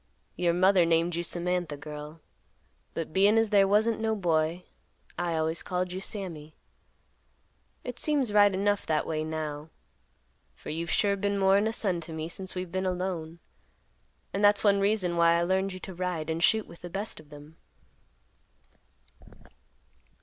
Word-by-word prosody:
Your 175 -1 +2
mother 185 +1 +4
named 165 +1 +2
you 170 - -1
Samantha, 175 -2 -1
girl, 150 +2 -9 0.7
but 160 -1 -4
bein' 200 +4 +4
as 225 -1 +2
there 200 -2 +5
wasn't 215 +3 +2
no 220 0 0
boy, 170 -2 0 0.5
I 175 -1 -1
always 160 +1 0
called 180 0 -2
you 185 - -4
Sammy. 170 -7 -6 1.3
It 250 -1 -6
seems 280 -8 0
right 205 -1 +6
enough 200 +2 0
that 155 -1 +1
way 155 -1 -2
now, 155 -1 -4 0.9
for - - -8
you've 165 +2 -3
sure 200 -1 +2
been 200 +1 -1
more'n 195 +2 +4
a - - 0
son 190 -6 -1
to 165 0 -7
me 160 +1 -4
since 190 +2 -6
we've 180 -1 -4
been 190 +1 -1
alone; 175 -3 -3 0.9
and 200 - -1
that's 205 0 +5
one 200 -2 +4
reason 195 -4 +1
why 170 0 +5
I 170 - +2
learned 190 +2 0
you 185 - -7
to 190 - -7
ride 175 -3 -3
and 160 +1 -2
shoot 220 +3 +3
with 170 - -14
the 175 - -7
best 200 +2 -4
of 155 -2 -16
them. 150 +2 -13
180 Hz, 165 wpm, -28 LUFS, 165-200 Hz, 1.3 s, right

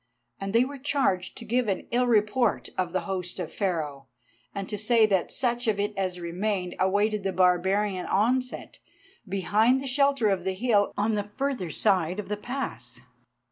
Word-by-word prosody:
And 195 0 -4
they 230 +4 +4
were 280 +1 -8
charged 260 -10 0
to 230 - -8
give 240 +1 +1
an 195 - -1
ill 245 +1 +2
report 220 +1 +2
of 180 -2 -1
the 185 - 0
host 185 -2 -4
of 175 - -5
Pharaoh, 155 -8 -2 0.5
and 195 -1 -4
to 210 - -4
say 220 +2 +4
that 195 -4 0
such 240 -1 -1
of 210 -2 +1
it 205 +1 -1
as 185 -2 -2
remained 180 +1 -2
awaited 205 +3 +2
the 195 0 -1
barbarian 185 +2 +2
onset 250 +5 0 0.5
behind 210 +7 +2
the 270 - -6
shelter 275 -3 +2
of 190 -3 0
the 190 0 -2
hill 210 -1 +2
on 215 +2 +1
the 205 -1 -1
further 265 -10 -1
side 185 0 +1
of 200 -2 -6
the 210 - -2
pass. 205 - -5
205 Hz, 180 wpm, -27 LUFS, 185-235 Hz, 0.5 s, they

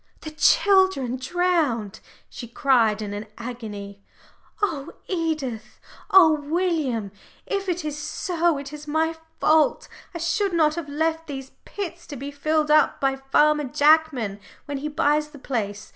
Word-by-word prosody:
"The 310 - -7
children 375 -6 +3
drowned!" 275 - 0 0.3
she 240 - -9
cried 230 -4 +2
in 205 -1 -5
an 205 +1 -6
agony. 210 -5 -7 0.6
"Oh, 330 -9 -2
Edith! 310 - -3 0.3
oh, 365 -5 +7
William! 295 - -1 0.3
if 395 -1 -2
it 350 -2 -2
is 300 0 -4
so, 340 +1 0
it 280 +1 -8
is 300 0 -9
my 320 +2 0 0.2
fault. 310 -1 +3 0.3
I - - -1
should 350 +4 0
not 310 -3 +3
have 320 -3 -5
left 320 +2 -1
these 270 -2 -7
pits 345 -4 -6
to 290 - -7
be 280 +2 -6
filled 305 +1 0
up 305 -1 +4
by 270 -1 +1
Farmer 295 +2 +2
Jackman 285 -7 +2 0.3
when 285 -1 -4
he 295 - -4
buys 300 0 +1
the 300 - -13
place. 215 -7 -4
300 Hz, 145 wpm, -24 LUFS, 255-325 Hz, 0.6 s, oh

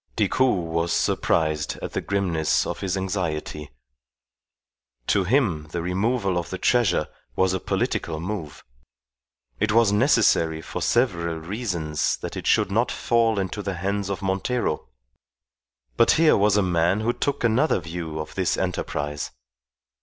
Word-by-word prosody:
Decoud 100 -5 +1
was 85 +1 0
surprised 80 -2 0
at - - -5
the - - -1
grimness 90 -6 0
of - - -4
his 95 -1 -2
anxiety. 85 -6 -3 1.4
To 100 +6 +2
him 95 - +1
the 85 +1 -3
removal 95 +1 0
of 85 - -6
the 95 - -4
treasure 95 -7 +2 0.3
was 95 0 +2
a 95 - -1
political 80 -3 -2
move. 85 -4 -5 1.0
It 110 +1 +1
was 115 -2 +4
necessary 105 - +3
for 80 - -6
several 85 -9 +1
reasons 85 -4 -2
that - - -6
it - - -5
should - - +3
not - - +1
fall 115 -2 +1
into 95 +2 -2
the 100 -2 -3
hands 100 +2 -2
of 100 0 -4
Montero, 95 -1 -1 1.1
but 115 - +5
here 160 -1 +5
was 105 0 +3
a 105 - +3
man 90 +3 +1
who 120 +2 +1
took 140 0 -2
another 120 +3 +3
view 80 -2 -5
of 75 - -6
this - - 0
enterprise. 75 0 -3
95 Hz, 145 wpm, -24 LUFS, 85-105 Hz, 1.4 s, but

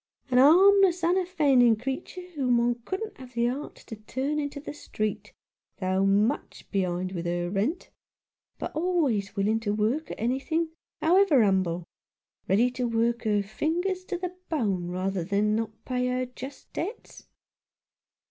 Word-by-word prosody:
A - - +2
harmless, 360 +6 +6
unoffending 310 -10 +4
creature, 270 - -5
whom 255 -5 +2
one 240 0 +1
couldn't 410 +2 -4
have 255 -2 -12
the 235 0 +2
heart 265 +5 -3
to 225 - -7
turn 260 +7 -3
into 285 0 -4
the 290 - -7
street, 215 -7 -4 0.5
though 190 0 +1
much 210 +7 0
behind 185 -2 -1
with 175 -2 -4
her 175 0 -1
rent; 220 - -1 0.7
but - - -5
always 305 - 0
willing 210 +3 +1
to 210 -2 -1
work 230 +9 0
at - - -7
anything, 275 +8 0 0.3
however 335 - +5
'umble 185 -4 +1 0.3
— - - -51
ready 230 +6 +4
to 250 0 -2
work 235 +1 0
her 210 -2 +2
fingers 345 - -1
to 365 - -3
the 360 0 -5
bone 200 - 0
rather 185 +1 -2
than 205 +3 +1
not 225 -1 -1 0.2
pay 250 -1 -1
her 255 0 0
just 260 +2 -10
debts. 405 +9 -6
245 Hz, 150 wpm, -27 LUFS, 205-315 Hz, 0.7 s, harmless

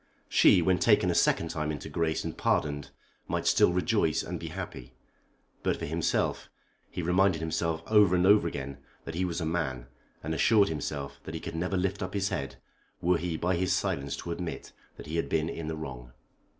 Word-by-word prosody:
She, 90 - +6
when 90 +1 +3
taken - - +4
a - - +1
second 85 - +2
time 75 -2 -2
into 75 - -6
grace 80 -1 -1
and - - -4
pardoned, 70 -1 0 0.4
might - - -2
still - - +5
rejoice 90 -3 +1
and - - -5
be - - -6
happy. 60 0 -7 0.7
But - - 0
for - - -4
himself, - - -1 0.4
he 90 - -4
reminded 90 0 +3
himself 80 0 -1
over 105 -4 +5
and 90 0 +3
over 100 -3 +6
again 70 -3 -5 0.3
that 80 - -5
he 90 +3 0
was 85 -1 -2
a 85 - -2
man, 70 -7 -2 0.4
and 80 +2 -2
assured 105 +4 +4
himself 70 -2 -4
that - - -6
he - - -3
could - - -6
never 90 +3 -1
lift 95 +2 -1
up 95 +1 -4
his 100 0 0
head 70 -2 -3 0.4
were 90 0 +2
he 85 -2 -2
by 90 +3 +1
his 90 +1 +1
silence 70 0 -1
to 85 - -6
admit 85 0 -5 0.3
that - - -9
he 80 +2 -3
had 85 - -1
been 80 0 +1
in 80 -2 -5
the 80 - -3
wrong. 65 -6 -7
85 Hz, 200 wpm, -29 LUFS, 75-90 Hz, 0.7 s, She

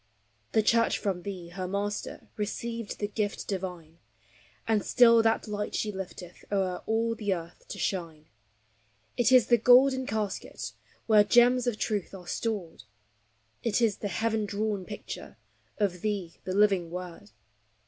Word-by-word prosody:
The 220 - +4
Church 230 +2 +3
from 190 -4 -2
thee, 180 -2 -6
her 185 +1 -5
Master, 200 +2 -3
Received 230 +1 -4
the 205 - -2
gift 205 0 -3
divine; 180 -4 -5 0.7
And 220 -2 +2
still 235 -2 +6
that 225 0 +1
light 210 0 -3
she 215 - -1
lifteth 185 -2 -8
O'er 190 -3 0
all 230 +1 +1
the 215 -3 -2
earth 170 0 -10
to - - -7
shine. 165 -5 -3 0.9
It 245 +1 +3
is 255 -2 +7
the 240 -1 +4
golden 260 +2 +5
casket 210 -2 -3 0.3
Where 215 -2 +6
gems 245 +4 +4
of 235 -3 0
truth 205 -3 -2
are 180 -2 -11
stored; 195 - -3 0.8
It 230 -2 +1
is 225 -4 +2
the 205 - -3
heaven 220 +2 0
drawn 205 -1 -2
picture 210 - -8 0.4
Of, 190 -5 0
thee, 200 -6 -3
the 185 - -2
living 195 -4 +3
Word. 175 - -7
205 Hz, 150 wpm, -28 LUFS, 185-225 Hz, 0.9 s, is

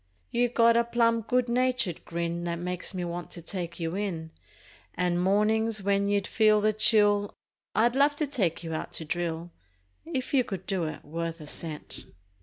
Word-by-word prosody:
You 245 +1 +2
got 230 -1 +5
a 235 - +5
plum 230 -1 +2
good 250 +2 +1
natured 250 -7 +1
grin 170 0 -2
That 170 -1 -1
makes 180 +1 -3
me 180 -1 -2
want 175 0 -5
to 170 - -6
take 175 -1 -5
you 165 +1 -2
in 170 -6 -3 0.6
And 175 0 +1
mornin's 210 +2 +2
when 200 0 +2
you'd 205 -1 +1
feel 215 -1 +4
the 215 +1 +2
chill 205 -2 +3 0.4
I'd 235 +4 +3
love 285 +2 +4
to 300 - 0
take 200 - -1
you 165 -1 -4
out 155 - -4
to 160 - -3
drill 170 +1 -3 0.5
If 275 -6 -4
you 265 -2 +5
could 190 -5 -6
do 190 -4 -1
it 155 - -6
worth 165 +2 -4
a 155 - -9
cent! 150 0 -6
200 Hz, 185 wpm, -28 LUFS, 170-230 Hz, 0.6 s, got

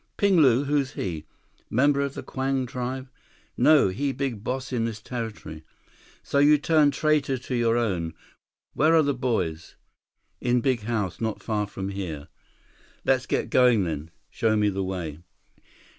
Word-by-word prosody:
"Ping 200 -2 +3
Lu? 135 -4 +5
Who's 140 -1 0
he? 80 -5 -4 0.4
Member 140 +4 +3
of 140 -1 -3
the - - -6
Kwang 135 0 -1
tribe?" 130 +2 -4 0.5
"No, 150 -9 +5
he 140 +9 -1
big 130 -6 -3
boss 130 +2 -3
in 115 -2 0
this 110 -2 -4
territory." 110 -9 -6 0.6
"So, 140 - 0
you 150 +1 +6
turned 150 -1 +3
traitor 145 -2 +1
to 125 +1 -7
your 115 -1 +2
own. 90 -9 -1 0.6
Where 160 +3 +3
are 160 - +5
the 140 -1 +1
boys?" 110 -11 -2 0.6
"In 125 0 +2
big 125 -1 0
house, 105 -7 -2
not 110 -2 -3
far 105 -2 -1
from 95 -1 -5
here." 85 -7 -6 0.8
"Let's 130 -1 +2
get - - -1
going 125 -5 +5
then. 80 -2 -4 0.2
Show 110 -1 +1
me 105 -1 +3
the 95 -1 -2
way." 85 -5 -4
120 Hz, 160 wpm, -25 LUFS, 100-140 Hz, 0.8 s, you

